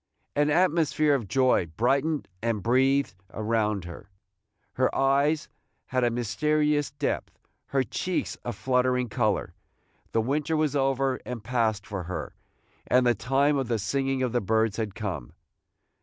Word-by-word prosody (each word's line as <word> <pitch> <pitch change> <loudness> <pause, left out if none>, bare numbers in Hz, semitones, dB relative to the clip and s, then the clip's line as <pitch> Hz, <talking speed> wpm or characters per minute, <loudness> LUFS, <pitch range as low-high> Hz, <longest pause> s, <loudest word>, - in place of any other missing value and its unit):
An 145 +1 +3
atmosphere 155 -2 +3
of 120 -7 -1
joy 130 -7 +3
brightened 140 +6 +1
and 110 -4 -1
breathed 135 +1 +2 0.2
around 110 -2 0
her, 85 +3 -10 0.6
her 130 0 +1
eyes 140 +3 +2 0.4
had 130 -1 0
a 120 - +4
mysterious 145 +6 +1
depth, 140 +1 -3 0.3
her 135 -1 +1
cheeks 180 - -2
a 120 - -3
fluttering 125 +1 +1
color. 105 -2 0 0.6
The 115 - +2
winter 150 +6 0
was 155 -2 +1
over 135 -1 +1
and 125 -4 -6
past 110 -3 0
for 95 -4 -5
her, 90 +1 -5 0.5
and 125 0 +4
the 120 - +5
time 135 +6 +2
of 130 - -2
the 115 -1 0
singing 135 +5 -1
of 125 - 0
the 120 0 +1
birds 110 +1 +1
had 110 -4 -3
come. 95 - -5
125 Hz, 145 wpm, -27 LUFS, 110-140 Hz, 0.6 s, the